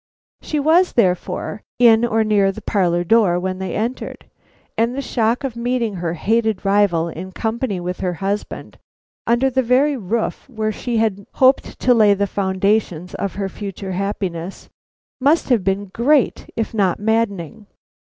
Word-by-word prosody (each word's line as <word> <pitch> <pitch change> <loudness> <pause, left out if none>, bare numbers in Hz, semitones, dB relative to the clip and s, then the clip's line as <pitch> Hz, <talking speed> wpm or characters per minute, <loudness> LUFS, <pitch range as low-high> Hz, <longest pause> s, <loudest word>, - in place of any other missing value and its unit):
She 305 - -2
was, 330 +5 +3
therefore, 195 0 0 0.2
in 230 -2 +6
or 225 -2 +2
near 205 -2 +2
the 210 +2 -10
parlor 175 -5 +1
door 185 -2 +3
when 185 +1 -3
they 190 -1 -4
entered, 235 +4 -4 0.5
and 230 +2 0
the - - -3
shock 230 +1 0
of 265 -4 -3
meeting 235 -2 -1
her 170 -1 -3
hated 220 +1 0
rival 195 -5 +2
in 175 +3 -7
company 220 -1 -2
with 180 +1 -4
her 180 -1 -1
husband, 195 +4 -4 0.5
under 240 +3 +2
the 260 - +2
very 260 +4 +2
roof 225 +4 -3
where 220 -3 -2
she 235 +2 -3
had 205 -3 -1
hoped 260 0 +2
to 250 - +4
lay 210 -3 +5
the 200 +1 0
foundations 190 -2 -1
of 200 - -4
her 195 0 -2
future 195 0 -6
happiness, 190 -2 -4 0.5
must 285 +5 +2
have 235 -7 +3
been 195 +1 0
great, 275 +3 +1
if 225 0 -2
not 195 -5 +1
maddening. 210 -2 -1
210 Hz, 160 wpm, -20 LUFS, 190-235 Hz, 0.5 s, in